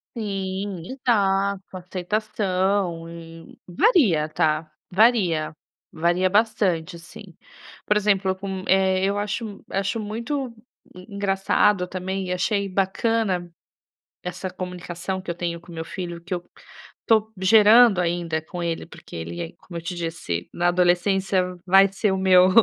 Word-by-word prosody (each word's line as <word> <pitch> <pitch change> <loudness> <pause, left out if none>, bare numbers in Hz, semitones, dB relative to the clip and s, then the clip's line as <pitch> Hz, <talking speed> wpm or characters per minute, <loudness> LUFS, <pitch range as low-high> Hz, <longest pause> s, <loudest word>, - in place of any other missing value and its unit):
Sim, 195 -4 -4
exato, 200 -6 +1
aceitação 185 -2 -1
e 165 0 -11
varia, 180 - +3
tá, 155 0 0 0.2
varia, 180 -8 +3 0.3
varia 175 +3 +1
bastante, 190 -6 +1
assim. 175 +2 -13 0.5
Por 210 - +2
exemplo 195 -2 +2
com, 190 -1 -5
eh, 190 0 +3
eu 200 +1 0
acho 210 +3 -2
m 205 -2 -9
acho 195 +3 -1
muito 235 +4 -4 0.4
e 185 +3 -13
engraçado 195 -1 +2
também 190 +1 -4
e 180 - -1
achei 200 +2 0
bacana 195 -1 0 0.7
essa 180 +1 -5
comunicação 180 0 -5
que 185 - -7
eu - - -2
tenho 170 -1 -4
com 170 - -16
o - - -9
meu 160 0 -4
filho, 175 -1 -6
que 180 - -9
eu 175 - -1 0.6
tô 220 -1 +3
gerando 215 +1 +6
ainda 170 -2 -1
com 175 +2 -7
ele, 165 -1 -3
porque - - -12
ele, 85 0 -6
como 175 - -11
eu 165 - -8
te 180 +2 -4
disse, 165 - -4
na 175 0 +1
adolescência 185 +2 +2 0.2
vai 195 +2 +6
ser 200 +1 0
o - - 0
meu 185 -1 +6
185 Hz, 140 wpm, -23 LUFS, 175-200 Hz, 0.7 s, gerando